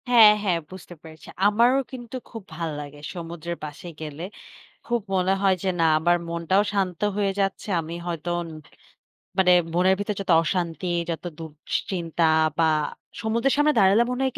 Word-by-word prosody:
হ্যাঁ, 225 -4 +9
হ্যাঁ, 180 -5 +1
বুঝতে 185 -1 -10
পেরেছি। 160 -1 -13 0.2
আমারও 235 +6 +4
কিন্তু 245 -1 -8
খুব 225 - -8
ভাল্লাগে 150 -3 -5
সমুদ্রের 170 0 -6
পাশে 150 +4 -9
গেলে 155 +1 -6 0.6
খুব 240 0 0
মনে 185 0 +2
হয় 195 -1 +4
যে 190 - -1
না - - +4
আমার 175 +2 +3
মনটাও 170 +4 +1
শান্ত 190 -4 -1 0.2
হয়ে 200 -2 +1
যাচ্ছে। 195 +2 -1
আমি 165 +1 -7
হয়তো 170 -1 -3 0.2
ন - - -9 0.9
মানে 180 -1 +6 0.2
মনের 185 +2 +4
ভিতর 205 +1 -1
যত 190 - -1
অশান্তি 175 +1 -2 0.2
যত 165 -2 -3 0.2
দুশ্চিন্তা 165 +2 -3 0.4
বা 165 - +5 0.6
সমুদ্রের 230 +4 +1
সামনে 295 +1 +4
দাঁড়ালে 200 +3 +5
মনে 250 +1 -2
হয় 265 - +1
180 Hz, 155 wpm, -24 LUFS, 165-210 Hz, 0.9 s, হ্যাঁ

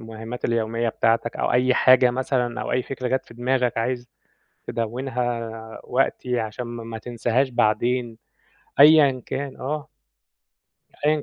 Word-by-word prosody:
المهامات 115 +1 -8
اليوميّة 115 0 0
بتاعتك 115 +1 0
أو - - 0
أي 125 +1 +3
حاجة 130 -1 +6
مثلًا 125 -1 -1
أو - - -3
أي 125 - +1
فكرة 130 -1 -4
جات 130 +1 0
في 115 - -14
دماغك 125 -1 0
عايز 120 +1 -2 0.6
تدوِّنها 120 0 -2 0.3
وقتي 125 -1 0
عشان 115 +2 -4
م 120 -1 -7
ما 115 - -5
تنساهاش 120 +3 0
بعدين 120 +1 0 0.6
أيًا 145 -3 +7
كان، 135 0 -4
آه. 150 +3 -4 1.2
أيًا 150 -1 +2
125 Hz, 135 wpm, -23 LUFS, 115-130 Hz, 1.2 s, أيًا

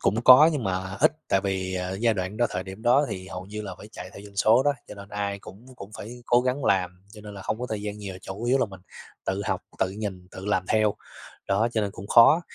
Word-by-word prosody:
cũng 110 +4 +1
có 130 +5 +10
nhưng 140 -6 -2
mà 95 0 -2
ít, - - +5 0.2
tại 95 - +3
vì, 95 -1 -2
ờ, 90 0 -3
giai 115 -1 +3
đoạn 95 +1 -3
đó 120 +1 +3
thời 90 - -3
điểm 95 +3 -10
đó 125 +5 +4
thì 95 -1 -6
hầu 95 -1 -7
như 105 +1 -6
là 95 -3 -6
phải 105 - -11
chạy 90 - -8
theo 100 - -10
doanh 100 -1 -14
số 110 +5 +5
đó, 145 +1 +3 0.2
cho - - -8
nên 100 -1 -11
ai 100 -1 -3
cũng 100 +5 -13
cũng 100 - -10
phải 120 +3 -9
cố 120 - +5
gắng 130 +2 -1
làm 95 -2 +2 0.2
cho 105 - -11
nên 105 -1 -10
là 95 - -8
không 110 +3 -2
có 125 - -2
thời 105 -2 -3
gian 105 0 -5
nhiều, 100 -2 -6
chủ 100 +5 -6
yếu 125 +3 +3
là 125 - +2
mình 95 -2 -12 0.5
tự 95 +1 -1
học, - - 0 0.2
tự 95 - +1
nhìn, 95 -3 -5
tự 95 - -9
làm 100 -3 +1
theo, 110 -1 +3 0.5
đó, 100 +4 +2
cho 110 - +1
nên 100 -1 -1
cũng 95 0 -9
khó. 120 +10 +7
100 Hz, 275 wpm, -26 LUFS, 95-115 Hz, 0.5 s, có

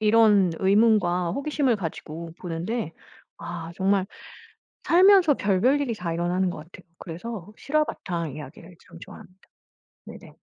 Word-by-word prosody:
이런 210 -4 +4
의문과 190 -4 +3
호기심을 280 -4 0
가지고 165 -2 -6
보는데 175 +2 -4 0.5
아 170 -1 -7
정말 195 0 +1 0.8
살면서 365 -3 +6
별별 225 +9 +2
일이 245 -5 -1
다 170 -4 -4
일어나는 175 +2 0
것 - - -6
같아요. 170 +3 -14 0.2
그래서 190 +3 -7
실화 305 +2 +1
바탕 170 - -5
이야기를 155 +4 -11
참 170 0 -13
좋아합니다. 185 +2 -14 0.7
네네. - - -12
190 Hz, 305 characters per minute, -25 LUFS, 170-230 Hz, 0.8 s, 살면서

